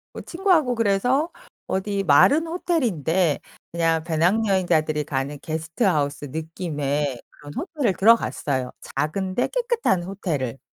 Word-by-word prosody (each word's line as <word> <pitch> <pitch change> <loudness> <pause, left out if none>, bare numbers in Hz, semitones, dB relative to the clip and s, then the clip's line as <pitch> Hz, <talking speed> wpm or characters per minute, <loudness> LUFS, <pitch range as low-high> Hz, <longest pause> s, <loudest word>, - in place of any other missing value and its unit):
뭐 - - -6
친구하고 335 -8 +1
그래서 240 - +1 0.3
어디 195 +1 -1
말은 280 - +5
호텔인데 190 - 0 0.3
그냥 165 -1 +1
배낭여행자들이 170 -3 +1
가는 140 0 -3
게스트하우스 160 - -1
느낌의 150 -3 -3
그런 145 0 -12
호텔을 300 - -1
들어갔어요, 145 - +2 0.3
작은데 185 - -1
깨끗한 470 - 0
호텔을. 155 - -3
175 Hz, 310 characters per minute, -23 LUFS, 150-230 Hz, 0.3 s, 말은